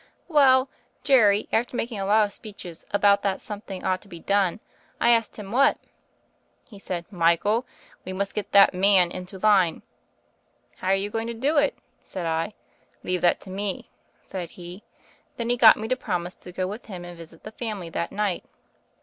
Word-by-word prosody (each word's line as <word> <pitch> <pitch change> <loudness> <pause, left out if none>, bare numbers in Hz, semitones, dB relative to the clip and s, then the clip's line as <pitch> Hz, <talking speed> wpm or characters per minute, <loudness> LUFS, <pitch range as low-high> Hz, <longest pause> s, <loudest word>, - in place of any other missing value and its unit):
"Well, 270 -4 +5 0.4
Jerry, 215 -7 +4
after 240 +2 0
making 230 -4 -3
a 195 - -2
lot 215 +1 +5
of 200 - -7
speeches 180 -6 -10
said 205 0 +4
that 195 -1 -1
something 205 -3 -7
ought 185 0 0
to - - -17
be 175 -4 -10
done. 200 +1 +1 0.4
I 235 - +4
asked 230 -2 +1
him, 200 -2 -8
what? 275 +4 +4 0.9
He 205 -5 -13
said, 175 -3 -5
'Michael, 185 +7 +2 0.4
we 185 - -6
must 195 +1 -3
get 210 - -4
the 200 0 +8
man 185 -1 +4
into 185 +1 -8
line.' 190 -4 +3 0.9
*How - - -6
are 190 - +4
you 200 +1 -3
going 225 +1 -2
to 235 - -4
do 280 +7 0
it 285 -1 +2 0.2
?' - - -40
said 185 -3 -6
I. 165 +5 -2 0.5
'Leave 180 0 -1
that 175 - +3
to 190 - -11
me,' 195 0 -4 0.3
said 180 -3 -6
he. 175 +2 -10 0.6
Then 235 0 -1
he - - +3
got 235 -2 +7
me 220 - -4
to 255 - +2
promise 180 -7 -3
to 180 - -13
go 185 +1 -2
with 205 +6 -7
him 180 -4 -8
and 175 0 -9
visit 165 -1 -14
the 215 - -8
family 210 -7 -5
that 170 - -3
night. 205 -3 -1
200 Hz, 190 wpm, -25 LUFS, 180-220 Hz, 0.9 s, the